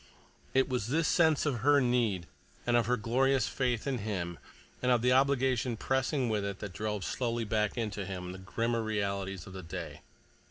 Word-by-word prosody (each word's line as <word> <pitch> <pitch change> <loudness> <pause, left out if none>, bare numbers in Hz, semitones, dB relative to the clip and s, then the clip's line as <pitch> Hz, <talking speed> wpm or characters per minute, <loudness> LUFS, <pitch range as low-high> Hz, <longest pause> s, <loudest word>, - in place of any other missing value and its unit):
It 135 - +4
was 125 -5 -1
this 155 +4 +1
sense 160 -3 +3
of 135 -5 0
her 145 +4 +5
need 120 -8 +1 0.4
and 120 - +2
of 120 -2 +3
her 125 0 +2
glorious 130 +5 +2
faith 125 -4 -1
in 135 -3 -1
him, 90 -5 -3 0.4
and 125 - +2
of 120 -2 +3
the 125 - +4
obligation 130 -3 +2
pressing 130 +2 0
with 105 -3 0
it 100 -1 -3
that 100 -3 -7
drove 105 -2 -3
slowly 120 -2 -1
back 105 0 0
into 105 -3 -2
him 90 -1 -5
the 95 - -8
grimmer 115 +5 -1
realities 100 -3 -2
of 95 - -10
the 95 - -6
day. 85 -2 -7
115 Hz, 190 wpm, -31 LUFS, 100-130 Hz, 0.4 s, her